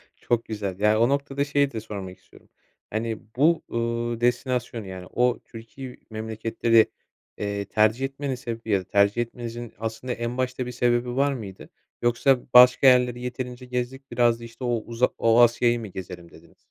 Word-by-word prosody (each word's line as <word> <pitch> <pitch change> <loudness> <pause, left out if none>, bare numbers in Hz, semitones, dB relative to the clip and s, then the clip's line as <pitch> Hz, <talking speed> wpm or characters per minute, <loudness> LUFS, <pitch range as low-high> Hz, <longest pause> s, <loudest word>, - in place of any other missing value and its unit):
Çok 120 -1 -1
güzel. 100 -3 -4
Ya, 105 +1 +3
o 120 +3 +4
noktada 140 0 0
şeyi 140 -1 +1
de 115 - -4
sormak 100 -4 -7
istiyorum. - - -21 0.4
Hani, 110 0 -3 0.2
bu, 160 +5 +3
uuu, 115 0 -2
destinasyonu, 125 -2 -1
yani, 95 -1 -8
o 125 0 +1
Türki 125 +3 -10
memleketleri, 110 +1 +1 0.5
eee, 100 -1 -3
tercih 110 +5 +2
etmenin 135 0 -4
sebebi 115 -3 -7
ya 100 -2 +3
da - - -11
tercih 100 +4 +2
etmenizin 120 0 -6
aslında 115 +3 -4
en 120 +2 -4
başta 130 0 -2
bir 125 - -5
sebebi 120 0 0
var 140 +1 +2
mıydı? 100 -7 -8 0.3
Yoksa 120 +2 +3
başka 125 +2 +8
yerleri 125 -1 +4
yeterince 125 0 -5
gezdik, 125 +2 -4
biraz 120 -1 +3
da - - -11
işte 115 +2 -10
o 120 -1 +1
uza 120 +2 +1
o 115 +1 +4
Asya'yı 120 0 +4
mı 110 - -6
gezelim 90 -2 -9
dediniz? - - -18
120 Hz, 170 wpm, -25 LUFS, 110-125 Hz, 0.5 s, başka